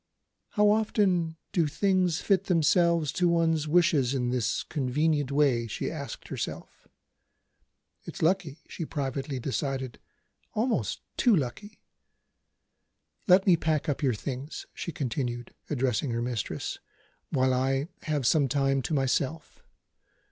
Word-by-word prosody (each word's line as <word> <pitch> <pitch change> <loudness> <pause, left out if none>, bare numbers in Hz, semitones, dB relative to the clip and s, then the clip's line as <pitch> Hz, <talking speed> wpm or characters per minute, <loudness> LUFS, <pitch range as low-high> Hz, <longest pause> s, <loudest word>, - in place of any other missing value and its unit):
"How 210 -1 +4
often 190 -6 +1
do 170 -4 +2
things 180 +1 +1
fit 195 -2 +2
themselves 170 -2 +3
to 180 -1 +2
one's 165 -2 +2
wishes 150 -5 +3
in 125 -2 0
this 125 -3 0
convenient 145 +1 0
way?" 135 -5 +2
she 105 - -3
asked - - -7
herself. - - -6 1.2
"It's - - -6
lucky," 165 -3 0
she 170 - -6
privately 135 -2 -3
decided 130 -1 -3 0.6
"almost 230 +2 0 0.2
too 240 -4 +5
lucky. 185 - -4 1.5
Let 185 +1 +6
me 185 - +6
pack 155 -2 0
up 145 - -1
your 130 -5 +2
things," 135 +6 -6
she 170 - -5
continued, 120 -4 -3 0.2
addressing 130 -2 0
her 115 0 -1
mistress, 120 -3 -3 0.5
"while 130 -1 +2
I 135 +3 +1
have 150 -4 -1
some 140 +2 +4
time 135 +1 +1
to 150 - -2
myself. 140 +3 -1
145 Hz, 125 wpm, -28 LUFS, 130-170 Hz, 1.5 s, Let